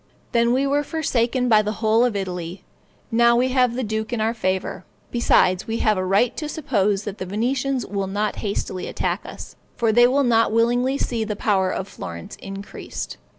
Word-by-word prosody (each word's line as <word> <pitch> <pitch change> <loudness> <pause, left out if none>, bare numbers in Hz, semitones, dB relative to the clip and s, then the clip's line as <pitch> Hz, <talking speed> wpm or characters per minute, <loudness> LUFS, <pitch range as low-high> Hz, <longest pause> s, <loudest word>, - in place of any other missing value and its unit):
Then 235 -1 +3
we 265 +3 +2
were 285 +1 +1
forsaken 255 -5 0
by 215 -3 +5
the 210 0 -2
whole 220 +2 +2
of 245 -4 +1
Italy; 180 -2 -4 0.5
now 235 +1 +5
we 250 +2 +2
have 250 -2 +2
the 255 - -2
duke 220 +1 -3
in 240 - -1
our 220 +1 +1
favor; 190 -4 -2 0.3
besides 185 -6 +3
we 225 0 -1
have 215 -2 +2
a 185 - -1
right 200 +6 +2
to 305 -1 -3
suppose 210 - 0
that 205 -2 -6
the 185 - -3
Venetians 250 +5 -1
will 195 -1 -3
not 205 +2 -2
hastily 200 -2 -3
attack - - -2
us; - - -9 0.2
for 230 -2 +2
they 240 +2 +6
will 275 +3 +2
not 230 -3 +3
willingly 245 +4 +2
see 235 -5 -1
the 215 -1 -3
power 195 -3 +1
of 190 - -3
Florence 85 - -8
increased. 195 +1 -7
225 Hz, 195 wpm, -22 LUFS, 200-245 Hz, 0.5 s, they